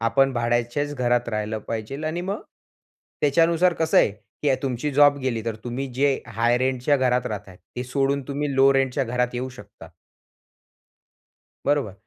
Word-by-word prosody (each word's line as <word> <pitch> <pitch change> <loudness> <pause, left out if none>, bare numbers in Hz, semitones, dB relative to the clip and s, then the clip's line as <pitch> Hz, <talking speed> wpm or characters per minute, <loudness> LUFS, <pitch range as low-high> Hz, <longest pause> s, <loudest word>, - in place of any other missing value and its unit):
आपण 135 +4 +3
भाड्याच्याच 120 +4 -1
घरात 120 -2 +1
राहायला 105 0 -2
पाहिजे 110 +4 -5
आणि 160 +2 -2
मग 195 +3 -3 0.8
त्याच्यानुसार 165 +4 +3
कसं 160 -1 +2
आहे, - - +4
की 110 +7 -3
तुमची 135 +2 -2
जॉब 145 +1 +6
गेली, 125 -5 -2
तर 115 -2 -3
तुम्ही 125 +3 -3
जे 140 +1 +2
हाय 120 +1 +1
रेंटच्या 130 +2 +1
घरात 125 -1 +1
राहताय, 100 -4 -6
ते 125 +6 -8
सोडून 140 +2 0
तुम्ही 140 0 -2
लो 135 +1 +6
रेंटच्या 135 -1 +1
घरात 125 0 -1
येऊ 125 +2 -3
शकता. - - -13 1.8
बरोबर, 140 -8 +1
130 Hz, 150 wpm, -24 LUFS, 120-140 Hz, 1.8 s, जॉब